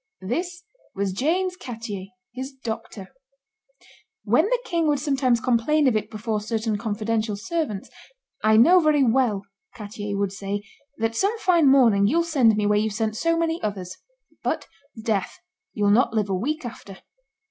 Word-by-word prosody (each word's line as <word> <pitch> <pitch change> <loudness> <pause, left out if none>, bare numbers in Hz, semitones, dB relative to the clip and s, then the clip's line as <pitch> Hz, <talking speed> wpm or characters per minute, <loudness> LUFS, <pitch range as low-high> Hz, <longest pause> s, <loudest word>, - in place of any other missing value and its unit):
This 345 - -3 0.3
was 195 -1 -1
James 360 - 0
Cattier, 225 - -7 0.3
his 260 +2 -6
doctor. 225 -5 -7 1.1
When - - +3
the - - +1
king 335 -2 0
would 295 -1 +2
sometimes 265 -4 +1
complain 255 +5 +2
of 245 - +2
it 215 - -1
before 215 0 -3
certain 220 0 -2
confidential 215 0 -1
servants, 230 - -3 0.6
'I 215 0 +5
know 340 +11 +7
very 305 -4 +3
well,' 230 -5 +2 0.3
Cattier 205 -2 -5
would 200 -1 -1
say, 200 +1 -4 0.3
that 225 0 -1
some 400 - +1
fine 345 -8 +3
morning 230 -7 +5
you'll 335 +9 +2
send 265 -10 +3
me 210 - +1
where 210 0 +3
you've 215 0 -1
sent 220 -1 -1
so 330 +8 +1
many 330 0 -1
others; 190 -4 -4 0.5
but, - - -2 0.3
'sdeath, 220 -3 -1 0.4
you'll 205 -1 +2
not 235 +1 +3
live 210 -2 0
a - - +1
week 285 +9 -2
after! 200 -5 -9
230 Hz, 160 wpm, -24 LUFS, 210-295 Hz, 1.1 s, know